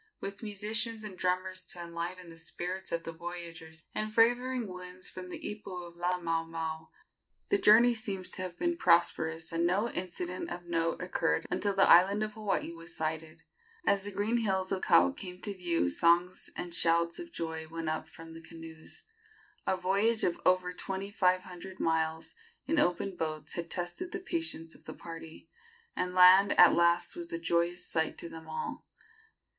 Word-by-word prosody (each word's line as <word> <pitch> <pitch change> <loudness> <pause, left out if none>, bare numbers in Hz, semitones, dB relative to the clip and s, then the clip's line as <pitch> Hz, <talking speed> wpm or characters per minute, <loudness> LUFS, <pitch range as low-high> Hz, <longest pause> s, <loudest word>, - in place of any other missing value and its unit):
With 200 0 -6
musicians 220 +2 -1
and 205 -3 -7
drummers 185 +1 -1
to 175 - -7
enliven 170 +1 -5
the 165 0 -12
spirits 180 +3 -5
of 170 0 -1
the 165 - -5
voyagers, 165 -1 -8
and 215 0 -2
favoring 245 +2 +3
winds 180 0 -7
from 185 0 -8
the - - -5
ipu 190 -4 -6
of 170 - -13
Laamaomao, 165 -2 -2 0.6
the 400 - +3
journey 235 - +7
seems 200 -5 -4
to - - -3
have 180 -2 -5
been 345 -1 0
prosperous, 165 - +2
and 165 0 0
no 205 +6 +1
incident 180 0 -4
of 175 0 -6
note 165 0 -1
occurred 175 -2 0
until 195 +2 0
the 195 - +5
island 195 +5 +6
of 215 0 -4
Hawaii 210 -5 -1
was 165 0 -9
sighted. 160 +1 -3 0.4
As 200 -1 +3
the 205 - -4
green 205 +4 0
hills 190 -4 0
of 190 - 0
Kau 90 +1 +5
came 180 - -8
to 205 - -4
view 175 - 0
songs 170 - +2
and 175 -1 -5
shouts 170 0 +2
of 345 -1 -8
joy 160 - -4
went 165 0 -5
up 155 0 -2
from 165 0 -11
the 165 - -10
canoes. 165 -1 -10 0.6
A 190 - +2
voyage 200 +5 +1
of 175 - 0
over 185 0 +3
twenty 195 +2 -5
five 185 -3 +3
hundred 185 +1 -10
miles 160 0 0 0.3
in 325 - +1
open 180 -2 +1
boats 155 -3 -3
had 170 -1 -4
tested 175 - -4
the 370 - -2
patience 330 - -3
of - - -17
the - - -7
party, 165 -1 -10 0.5
and 180 0 -2
land 185 +2 +7
at 175 - +9
last 170 0 +3
was 170 -1 -6
a 165 - -2
joyous 170 +1 0
sight 160 -1 -1
to 170 - -7
them 160 0 -10
all. 470 - -5
180 Hz, 175 wpm, -31 LUFS, 165-195 Hz, 0.6 s, at